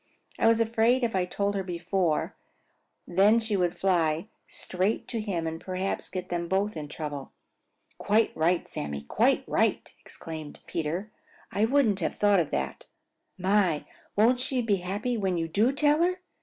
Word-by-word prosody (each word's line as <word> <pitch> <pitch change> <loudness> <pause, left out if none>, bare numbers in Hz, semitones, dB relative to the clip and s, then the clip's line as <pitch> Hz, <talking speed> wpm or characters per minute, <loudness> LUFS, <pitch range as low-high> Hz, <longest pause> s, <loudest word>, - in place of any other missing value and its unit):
"I - - +4
was 225 0 +5
afraid 230 +3 +2
if 230 -4 0
I 185 -1 +2
told 200 +2 -1
her 200 - -1
before 180 -2 -1 0.7
then 200 +6 +5
she 220 -2 -2
would 175 -2 0
fly 170 0 +1 0.2
straight 190 +4 -2
to 230 -3 -2
him 185 -6 -2
and 160 0 -4
perhaps 185 +1 -3
get 185 -1 -5
them 170 -1 -2
both 195 +4 0
in 150 -2 -5
trouble." 145 -2 -6 0.7
"Quite 215 +2 +2
right, 170 +2 +1
Sammy! 70 -1 -4
Quite 70 - +2
right!" - - +1
Peter - - -17
exclaimed. 155 -2 -9 0.9
"I 210 - +2
wouldn't 230 -6 +3
have 165 - -2
thought 205 -2 +4
of 160 - 0
that. 65 0 -3 0.5
My, 185 -4 +2 0.3
won't 235 +4 +4
she 255 -1 0
be 205 -3 +2
happy 205 +7 -2
when 190 -4 0
you 165 -1 -1
do 210 +10 +2
tell 295 +2 +3
her! 365 +2 +1
195 Hz, 165 wpm, -27 LUFS, 170-225 Hz, 0.9 s, was